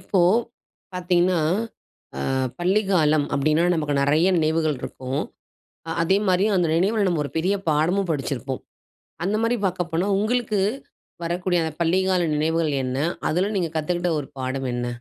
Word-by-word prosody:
இப்போ 190 - 0 0.7
பார்த்தீங்கன்னா, 180 -1 +2 0.8
அ - - -3 0.4
பள்ளிக்காலம் 175 -6 +2
அப்டின்னா 155 +4 +2
நமக்கு 150 -3 -1
நெறைய 155 +6 +3
நினைவுகள் 155 -2 +1
இருக்கும். 130 +2 -4 0.7
அ - - -5
அதே 190 +4 +3
மாரி 185 +1 +3
அந்த 175 -2 +2
நினைவுல 200 +4 +2
நம்ம 170 -4 0
ஒரு - - -7
பெரிய 185 +5 +1
பாடமும் 170 +5 +1
படிச்சிருப்போம். 135 -3 -3 0.6
அந்த 200 +3 0
மாரி 230 +2 +2
பார்க்கப்போனா 175 -1 -1
உங்களுக்கு 215 0 0 0.6
வரக்கூடிய 175 +1 0
அந்த 160 -1 -3
பள்ளிக்கால 180 +1 +2
நினைவுகள் 160 0 +1
என்ன? 130 0 -2 0.3
அதுல 185 +6 0
நீங்க 175 -3 0
கத்துக்ட்ட 175 +3 -1
ஒரு 140 - -6
பாடம் 130 +1 -2
என்ன? 120 0 -2
170 Hz, 135 wpm, -23 LUFS, 150-185 Hz, 0.8 s, நெறைய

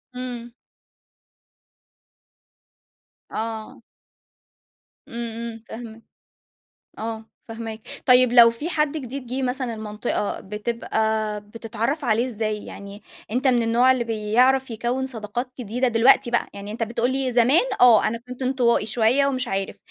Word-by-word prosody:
إمم. 245 -2 -6 2.8
آه. 220 -1 -5 1.3
إمم، 235 - -7 0.3
إمم 225 -1 -10
فاهماك 225 -1 -9 1.0
آه، 225 0 -5 0.2
فاهماك. 225 -1 -6 0.3
طيب 250 -1 +6
لو 235 -1 +8
في 235 +9 -4
حد 300 -2 +1
جديد 265 -2 -6
جِه 260 +2 -3
مثلًا 250 -2 -1
المنطقة 210 -1 -3
بتبقى 215 0 -2
بتتعرّف 230 +7 -4
عليه 235 +2 +2
إزاي؟ 215 -3 -3
يعني 200 +1 -10 0.3
أنت 255 +4 +1
من 240 -2 +3
النوع 240 +3 +4
اللي 245 -2 -1
بيعرَف 240 +4 +2
يكوِّن 240 +4 -2
صداقات 240 +1 -4
جديدة 245 +3 0
دلوقتي 240 +2 +4
بَقى 235 - 0
يعني 200 +1 -7
أنت 230 +2 -5
بتقول 235 +2 0
لي 265 -2 -1
زمان 250 - +4 0.2
آه، 240 -3 +7
أنا 230 +1 -1
كنت 250 +1 -7
انطوائي 250 -4 +2
شوية 240 +5 +2
ومش 255 -3 -1
عارف، 195 0 -3
235 Hz, 125 wpm, -23 LUFS, 220-255 Hz, 2.8 s, لو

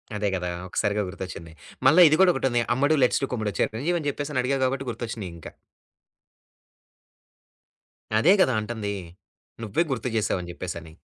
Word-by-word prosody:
అదే 105 0 -1
కదా! 90 -1 -3 0.2
ఒక్కసారిగా 105 +3 0
గుర్తొచ్చింది. 90 -3 -8 0.3
మల్ల 155 +6 +6
ఇది 155 - +4
కూడా 185 -2 +7
ఒకటుంది. 125 -3 +1
"అమ్మడు 145 +4 +2
లెట్స్ 125 - +2
డు 135 - -1
కుమ్ముడు." 110 -4 -2
చిరంజీవి 145 +11 0
అని 145 - -4
చెప్పేసని 145 -1 -2
అడిగావు 135 +1 0
కాబట్టి 135 0 -2
గుర్తొచ్చినయి 115 -5 -5
ఇంకా. 80 - -10 2.7
అదే 175 - +6
కదా! 130 -8 +3
అంటుంది. 105 -2 -4 0.7
నువ్వే 110 - +1
గుర్తు 125 -1 -2
చేసావు 105 -3 0
అని 85 - -9
జెప్పేసని. 80 -3 -7
120 Hz, 145 wpm, -25 LUFS, 100-135 Hz, 2.7 s, కూడా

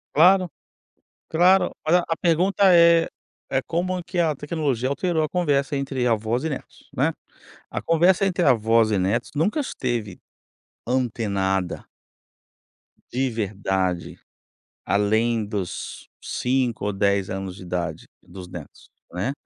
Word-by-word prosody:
Claro 180 +4 +6 0.8
claro, 180 +4 +3
olha, 170 +3 +4
a 165 - 0
pergunta 180 +5 +1
eh, 170 -1 +6 0.4
é 135 - +1
como 180 +2 -2
que 175 +1 -4
a 160 -3 +2
tecnologia 145 -5 -2
alterou 160 +4 0
a 155 - +1
conversa 145 -5 0
entre 135 -2 -1
avós 115 +3 0
e - - 0
netos, 140 - -8
né. - - +2 0.6
A - - -5
conversa 175 +4 +3
entre 180 -2 +1
avós 115 -4 +3
e 100 - +2
netos 100 +6 0
nunca 170 - +1
esteve 120 - -3 0.7
antenada. 100 -7 -1 1.2
De 130 +1 0
verdade, 95 -5 -2 0.7
além 110 +3 +1
dos 100 -4 -5 0.2
5 125 -4 -1
ou 105 - -1
10 100 -1 +1
anos 95 -1 -5
de 95 - -11
idade 85 -3 -4 0.2
dos 90 0 -11
netos, 85 -4 -11 0.2
né. 95 +9 -2
125 Hz, 125 wpm, -23 LUFS, 100-165 Hz, 1.2 s, Claro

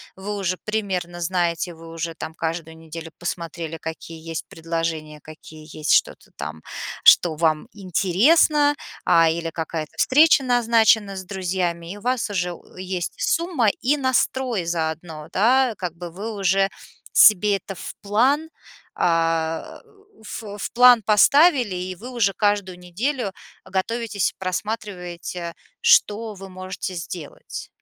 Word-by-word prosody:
Вы 200 +2 -5
уже 185 -2 -1
примерно 185 -5 -3
знаете, 175 0 -1
вы 165 0 -12
уже 165 0 -4
там 160 0 -7
каждую 160 0 -4
неделю 165 0 -9
посмотрели, 170 -2 -5
какие 160 0 -7
есть 165 -1 -4
предложения, 165 -2 -4
какие 155 0 -13
есть, 155 -1 -1
что-то - - +1
там, 80 0 -6 0.4
что 165 -3 +7
вам 155 -1 +1
интересно, 235 - +3 0.3
а, 165 -1 +5
или 165 0 -2
какая-то 160 -1 -4
встреча 295 +1 +5
назначена 225 -4 +3
с 190 - -6
друзьями, 180 -3 -2
и 205 - -7
у - - -13
вас 250 -2 0
уже 180 -3 -1
у - - -16
есть 185 -1 -3
сумма 330 -9 +1
и 285 +4 +2
настрой 260 -4 0
заодно, 160 -1 -3
да, 245 +4 +3
как 175 -3 -4
бы 175 -1 -7
вы 215 +5 -6
уже 195 0 +2 0.4
себе 210 -1 +6
это 195 +1 -8
в - - -8
план, 260 +10 +2 0.5
а, 165 -1 0 0.4
в 210 -1 -7
в - - -4
план 245 -1 +7
поставили, 245 - +5
и 185 +1 -4
вы 245 +8 -9
уже 210 -5 +1
каждую 205 -3 0
неделю 210 +5 -2 0.3
готовитесь 210 +1 -1
и - - -41
просматриваете, 180 -3 -4 0.3
что 215 0 +3
вы 195 0 -10
можете 185 0 -6
сделать. 170 -2 -7
185 Hz, 135 wpm, -23 LUFS, 165-220 Hz, 0.5 s, что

